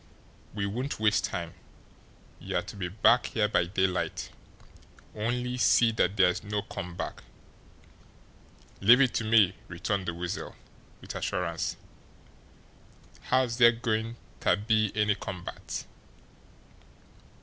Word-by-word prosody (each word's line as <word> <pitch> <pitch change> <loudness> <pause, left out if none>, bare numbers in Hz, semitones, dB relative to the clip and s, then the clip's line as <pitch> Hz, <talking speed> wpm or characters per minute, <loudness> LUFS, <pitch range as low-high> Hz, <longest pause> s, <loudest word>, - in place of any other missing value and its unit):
We 100 -2 -1
won't 125 +8 -3
waste 105 -4 +2
time. 85 -3 -5 0.9
You're - - -2
to - - -9
be 95 -3 -3
back 115 +6 +3
here 110 -2 +1
by 105 - +2
daylight 95 -1 -1 0.8
only 125 +3 -2
see 120 -2 +4
that 105 -2 0
there's 90 -1 +3
no 105 0 -2
come 90 -1 -7
back." - - -6 1.6
"Leave 120 +6 +7
it 130 -3 +3
to - - -1
me!" 110 -4 +4
returned 95 +2 -3
the 85 - -2
Weasel, 90 +2 -5 0.5
with - - -8
assurance. 85 -3 -2 1.5
"How's 125 -2 +2
dere 120 -1 +7
goin' 115 -1 -2 0.2
ter - - +3
be 110 0 +1
any 105 -1 +3
come 95 -3 -7
back? - - -8
105 Hz, 120 wpm, -28 LUFS, 90-115 Hz, 1.6 s, Leave